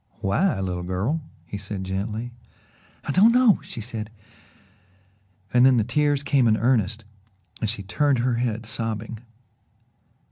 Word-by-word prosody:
"Why, 130 - +1
little 90 -2 -2
girl?" 95 - -1 0.2
he 100 - -6
said 95 -1 -5
gently. 105 +5 -3 0.7
"I - - -2
don't 205 +10 +6
know 245 -3 +5
" - - -18
she 115 - -8
said 110 -2 -6 1.4
and 125 0 +5
then 130 -1 +6
the 110 - +3
tears 145 +4 +1
came 140 -4 +3
in 110 -1 +3
earnest 115 -3 +1 0.6
and 110 - 0
she 105 -3 -4
turned 140 +7 +1
her 120 0 +1
head, 115 -2 -2
sobbing. 115 0 -4
115 Hz, 145 wpm, -24 LUFS, 105-130 Hz, 1.4 s, don't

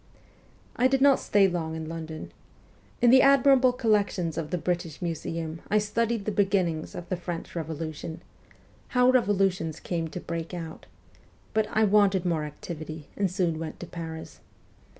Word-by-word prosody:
I 255 - +5
did 270 0 +2
not 275 0 +5
stay 200 -1 +4
long 165 -3 -3
in 160 -1 -5
London. 160 -1 -6 0.7
In 240 - +7
the 260 +1 +8
admirable 275 -2 +6
collections 205 -8 +1
of 155 -2 -3
the 180 - -1
British 170 -3 -2
Museum 165 -1 -4
I 210 - +3
studied 220 +1 0
the 215 - 0
beginnings 190 -6 0
of 175 - -7
the 185 - 0
French 175 -1 -6
Revolution 160 0 -5 0.8
how 250 +1 +6
revolutions 195 -9 +1
come 165 -2 -2
to 170 - -6
break 170 +1 -5
out; 165 -2 -8 0.7
but 220 -1 +2
I 220 - +2
wanted 200 -3 +4
more 165 -3 0
activity, 155 0 -8
and 200 -2 +1
soon 175 -3 0
went 160 -1 -6
to - - -6
Paris. 160 -1 -8
175 Hz, 155 wpm, -27 LUFS, 160-210 Hz, 0.8 s, the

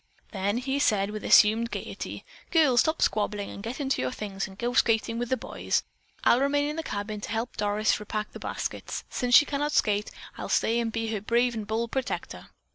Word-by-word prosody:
Then 200 +2 -1
he 265 +3 -1
said 205 -6 +2
with 215 0 -6
assumed 225 +2 +5
gaiety: - - -6 0.2
"Girls, 300 -8 +4
stop 315 0 +2
squabbling 210 -1 0
and - - -8
get 230 +6 -5
into 275 -2 0
your 130 - 0
things 195 +1 -4
and 190 0 -13
go 240 +2 -2
skating 230 -1 +2
with 240 -1 -3
the 260 - +1
boys. - - -2 0.4
I'll 240 - +5
remain 285 +1 +2
in 300 - -3
the 325 - -2
cabin 210 -7 -4
and 210 -1 -5
help 225 +3 -3
Doris 210 +1 +1
repack 215 0 -4
the - - -9
baskets. - - -4
Since 245 -1 +2
she 290 - +8
cannot 295 +1 -1
skate, 210 -1 +2 0.3
I'll - - -5
stay 230 +1 +2
and 230 -1 -1
be 225 0 -2
her 215 -3 -2
brave 235 +3 +2
and 220 -2 -5
bold 225 +2 -1
protector." 265 -1 -4
225 Hz, 205 wpm, -27 LUFS, 210-250 Hz, 0.4 s, she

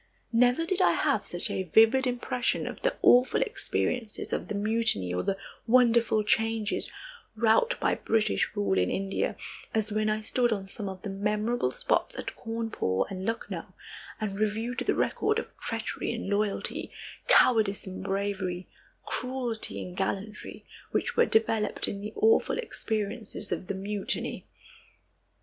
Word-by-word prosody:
Never 245 +7 +4
did 375 +2 0
I - - +5
have - - +1
such - - 0
a - - -1
vivid 225 +8 +5
impression 250 0 -1
of - - -6
the - - +1
awful 250 +1 +6
experiences 235 -4 -2
of - - -2
the 210 - -3
mutiny, 205 - +1
or 90 - 0
the 195 - -1 0.3
wonderful 235 -2 +4
changes 220 0 +1 0.5
wrought - - +3
by - - +2
British 215 - +1
rule 95 -2 +1
in 90 - +2
India, 195 0 -1 0.4
as 220 -1 0
when 215 0 +1
I 215 0 0
stood 240 +2 +1
on 200 -3 -1
some 200 +1 -5
of 190 -1 -9
the 205 - -4
memorable 210 +4 0
spots - - 0
at - - -5
Cawnpore 225 - -1
and 190 0 -4
Lucknow, 225 0 -4 0.4
and 205 -2 -3
reviewed 220 +3 -1
the - - +1
record 425 +1 +1
of - - -5
treachery 225 0 -2
and 235 -3 -4
loyalty, 200 0 -1 0.4
cowardice 220 -5 +4
and 190 -1 -7
bravery, 190 -2 -2 0.4
cruelty 250 -3 -2
and 180 - -8
gallantry, 200 +2 -4 0.2
which - - -1
were 475 0 +4
developed 220 -1 +2
in 200 - -4
the 210 - -5
awful 445 +2 +3
experiences 215 - -3
of 180 - -3
the 200 - -2
Mutiny. 200 +1 -3
215 Hz, 150 wpm, -28 LUFS, 200-240 Hz, 0.5 s, awful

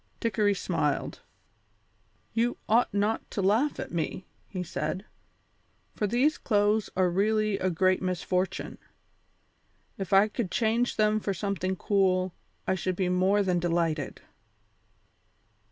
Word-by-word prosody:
Dickory 210 -3 +1
smiled. - - -1 1.1
"You 235 +1 +1
ought 230 +3 +3
not 205 +2 0
to - - -5
laugh 225 +10 +2
at - - -5
me," 170 +2 -3 0.2
he 185 -3 -4
said, 185 +3 -3 0.9
"for 210 - -1
these 255 +8 +2
clothes 210 -1 +2
are 185 -1 +4
really 210 +3 +1
a 185 - +1
great 185 +2 +2
misfortune. 185 0 -2 1.2
If 190 -3 -4
I 195 +2 +6
could 215 -2 -3
change 230 +4 +1
them 215 0 +3
for 200 -2 -2
something 190 -1 -2
cool 185 -2 +1 0.3
I - - +1
should 185 0 -2
be 185 0 0
more 190 +3 +3
than 180 -2 +1
delighted." 165 -4 -1
195 Hz, 125 wpm, -28 LUFS, 185-215 Hz, 1.2 s, I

